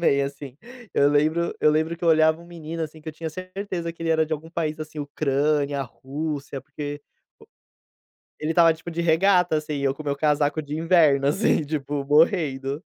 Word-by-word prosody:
também 140 -4 +3
assim. 140 -1 -6 0.4
Eu 140 - +4
lembro 155 +4 +1
eu 150 - +5
lembro 160 +2 0
que 170 - -27
eu - - +3
olhava 160 0 +4
um 170 - -14
menino 165 -1 -6
assim 155 0 -7
que 155 - -9
eu 155 - -5
tinha 160 +1 -5
certeza 185 -1 -5
que 165 - -11
ele 165 - -2
era 160 0 +3
de 160 - -5
algum 155 +1 -4
país 155 -2 -3
assim, 155 0 -7
Ucrânia, 145 0 0
Rússia, 140 +2 -5
porque 145 0 -7 1.4
ele 155 +1 -1
estava 165 -1 +6
tipo 160 +2 -9
de 170 0 -3
regata 175 0 +3
assim, 150 -1 -3
eu 135 -1 +1
com 155 - -8
meu 140 -1 -2
casaco 150 +1 +1
de 145 +1 -5
inverno 160 -5 +4
assim 160 +1 +2
tipo, 145 -1 -3
morrendo. 145 -2 +2
155 Hz, 190 wpm, -24 LUFS, 145-165 Hz, 1.4 s, estava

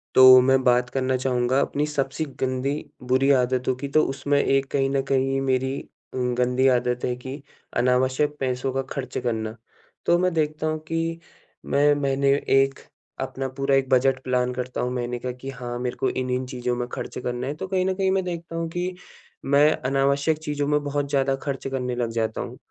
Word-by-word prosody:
तो 130 0 +10
मैं 135 +1 +3
बात 125 0 +3
करना 130 0 0
चाहूँगा 125 0 +1
अपनी 145 +1 0
सबसे 145 +1 -2
गंदी, 130 +3 -1 0.2
बुरी 130 +2 +2
आदतों 130 -1 +2
कि 135 +3 -5
तो 155 +3 +3
उसमें 140 +1 0
एक 135 0 +2
कहीं 135 -1 +1
न 135 0 +1
कहीं 135 0 +2
ये 135 - +1
मेरी 130 0 0
अ, - - -15 0.3
गंदी 125 +1 +1
आदत 125 0 -2
है 125 - -1
कि 130 +3 -8 0.4
अनावश्यक 130 +4 +2
पैसों 130 0 -1
का 135 - 0
खर्च 130 -2 -4
करना, 110 -3 -2 0.5
तो 175 - +4
मैं 185 -1 +1
देखता 155 0 -1
हूँ 155 0 -1
कि 165 0 -2 0.5
मैं 145 +1 +3
मैंने 140 -1 +1 0.2
एक 135 0 +3 0.4
अपना 135 0 -3
पूरा 135 0 +2
एक 135 -1 +1
बजट 130 0 +3
प्लान 125 -1 0
करता 125 0 -4
हूँ 125 - -1
महीने 120 0 -3
का 125 - -3
कि 125 +2 -8
हाँ 120 -2 -5
मेरे 125 0 -3
को 130 - +1
इन-इन 130 0 -2
चीज़ों 125 -1 -2
में 120 0 -3
खर्च - - -6
करना 125 +1 -3
है। 145 - -2
तो 190 +5 -5
कहीं 185 -1 0
न 190 - +1
कहीं 190 0 +1
मैं 190 0 +1
देखता 170 -2 -5
हूँ 165 0 -2
कि 180 +2 -3 0.5
मैं 145 +2 +5 0.2
अनावश्यक 140 +3 +2
चीज़ों 145 -2 -2
में 150 0 +1
बहुत 145 0 -2
ज़्यादा 135 -1 +1
खर्च 135 -2 -3
करने 125 -2 -2
लग 120 -1 -1
जाता 115 -1 -1
हूँ, - - -7
135 Hz, 200 wpm, -24 LUFS, 125-145 Hz, 0.5 s, तो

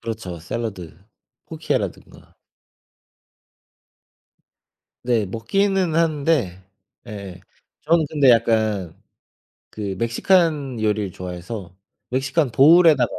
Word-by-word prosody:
그렇죠. 110 -7 -6
샐러드, 90 -2 -6 0.5
쿠키라든가. - - -5 2.7
네. 115 -4 +1
먹기는 185 - 0
하는데 150 - 0 0.4
예예. 100 -4 -8 0.4
저는 160 0 +2
근데 145 -4 +4
약간 110 -6 +1 0.7
그 100 -3 -5
멕시칸 140 - +1
요리를 105 -3 -1
좋아해서 90 +1 -8 0.3
멕시칸 135 +1 -1
보울에다가 155 0 +6
115 Hz, 205 characters per minute, -21 LUFS, 100-150 Hz, 2.7 s, 보울에다가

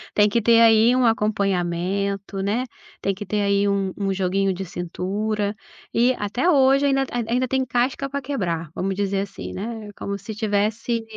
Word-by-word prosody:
tem 210 0 +5
que 230 +3 +1
ter 230 +1 +5
aí 225 +2 +6
um 255 -1 +3
acompanhamento, 200 -2 0
né, 210 +6 0 0.4
tem 195 - 0
que 200 +2 -7
ter 210 +2 -1
aí 200 0 +2
um 195 -1 0
um 195 -1 -1
joguinho 190 +1 0
de 190 +1 -5
cintura 200 +4 -3 0.4
e 245 +2 +4
até 240 - 0
hoje 275 -2 +4
ainda 270 -1 +2
ainda 240 +1 0
tem 260 +1 0
casca 255 +3 0
pra 280 +1 -3
quebrar, 175 - -3
vamos 195 +1 -2
dizer 200 0 -1
assim, 200 0 -5
né, 220 +1 -6
como 200 0 -4
se 205 +3 -8
tivesse 215 +2 -1
205 Hz, 170 wpm, -23 LUFS, 195-235 Hz, 0.4 s, aí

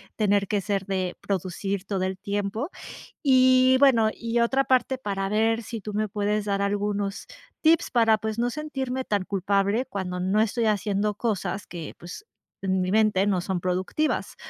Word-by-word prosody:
tener 205 -2 +2
que 205 - 0
ser 195 -1 -2
de 185 -2 -2
producir 195 +1 -3
todo 190 -2 -2
el 190 0 -2
tiempo 205 - -3 0.5
y 255 -1 +5
bueno, 240 -6 +5
y 235 0 -2
otra 265 +3 +2
parte 260 0 +2
para 195 -5 -3
ver 225 +3 +1
si 225 0 -6
tú 210 +1 -6
me 215 +1 0
puedes 210 +1 -1
dar 200 -1 0
algunos 200 0 -1 0.4
tips 325 0 +3
para 225 -2 +4
pues 220 +1 -4
no 240 +1 +1
sentirme 265 -2 -4
tan 205 -5 -1
culpable 200 +4 0
cuando 190 -7 -4
no 190 +3 +1
estoy 225 +2 +1
haciendo 210 0 0
cosas 205 -3 -2
que 170 -3 -8
pues 175 - -10 0.4
en 190 -1 0
mi 185 - -1
mente 210 -2 +3
no 190 -3 +1
son 185 0 -2
productivas. 185 - -1
205 Hz, 170 wpm, -25 LUFS, 195-235 Hz, 0.5 s, y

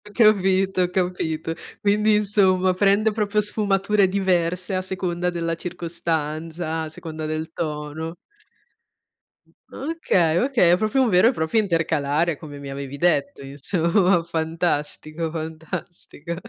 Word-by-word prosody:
Capito, 195 -3 +3
ho 180 - +1
capito. 165 -3 -1 0.3
Quindi 210 +1 +3
insomma 190 -3 +3
prende 205 +3 +3
proprio 210 -1 0
sfumature 205 -1 +2
diverse 185 -1 0
a 185 - 0
seconda 180 -1 -2
della 165 -1 -2
circostanza, 165 -1 -3
a 160 - -4
seconda 155 0 -7
del 155 +1 -4
tono. 155 +1 -4 1.6
Okay, 195 - 0
okay, 240 -6 +3
è - - +6
proprio 215 +6 0
un 255 - +3
vero 185 +4 +5
e - - +4
proprio 160 +4 0
intercalare 165 -4 +1
come 145 -2 -10
mi 140 -1 -8
avevi 140 0 -6
detto, 155 -6 +1
insomma, 170 +6 +1
fantastico, 160 -1 -2
fantastico. 160 0 -6
175 Hz, 120 wpm, -23 LUFS, 160-195 Hz, 1.6 s, è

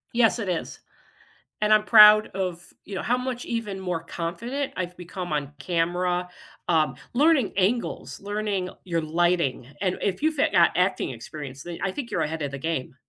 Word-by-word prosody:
Yes, 235 0 +3
it 200 -4 -3
is, 175 -2 -3 0.8
and 210 0 +4
I'm 215 0 +5
proud 215 -1 +8
of, 180 -3 -5
you 200 - -8
know, - - -2
how 245 - +1
much 250 -1 -4
even 230 -5 -3
more 180 -3 -3
confident 235 +13 -4
I've 180 -1 -4
become 180 0 -6
on 145 -1 -2
camera, 175 +3 0 0.4
um, 160 -3 +2 0.2
learning 285 -2 +3
angles, 215 +5 -1
learning 205 -2 -2
your 170 -3 -1
lighting, 165 -5 0
and 185 -2 0
if 195 +3 -1
you 315 +1 +3
fit 310 - +1
got - - +5
acting - - +1
experience, 140 -3 -8
then 175 -1 -7
I 195 - 0
think 240 +3 -6
you're - - 0
ahead 160 +1 -2
of 145 -2 -2
the 140 - -5
game. 135 -4 -3
185 Hz, 180 wpm, -25 LUFS, 165-215 Hz, 0.8 s, proud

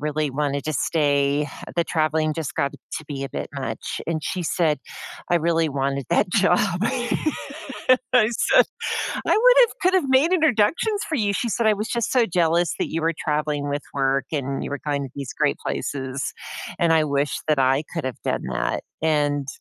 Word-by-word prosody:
really 150 0 -1
wanted 140 0 -1
to 155 - -2
stay, 145 -1 +1 0.3
the 170 - +2
traveling 155 -1 +1
just 160 -2 -4
got 140 - 0
to 155 - -8
be 140 -2 -5
a - - -4
bit - - -5
much," 130 -6 -4
and 160 -2 -2
she 185 - -2
said, 160 -2 +1 0.5
"I 175 - +5
really 165 0 +1
wanted 140 -1 -2
that 195 - +2
job," 195 0 +3 1.6
I 225 -4 +6
said, - - +4 0.6
"I - - 0
would - - +6
have 475 - +6
could 370 +1 +3
have 295 -8 +2
made 275 +7 +4
introductions 320 - +2
for 320 - -2
you," 205 -5 +1
she 235 - -1
said, 230 +1 0
"I 215 - +5
was 210 +2 -3
just 235 0 -1
so 250 -3 +4
jealous 170 -2 +2
that - - -2
you 165 0 -2
were 165 +1 +2
traveling 150 -1 -1
with 145 0 -2
work, 135 -1 +1
and 140 -2 -2
you - - -5
were 145 - -4
going 145 -1 0
to 135 - -6
these 140 -3 -6
great - - +1
places, 135 0 -3 0.5
and 170 -1 +3
I 160 -1 +4
wish 140 -1 0
that 150 -2 +3
I 135 +2 +3
could 165 -4 -3
have 130 -3 -3
done - - -1
that," - - -1 0.2
and, 145 -3 +1
155 Hz, 195 wpm, -23 LUFS, 140-195 Hz, 1.6 s, I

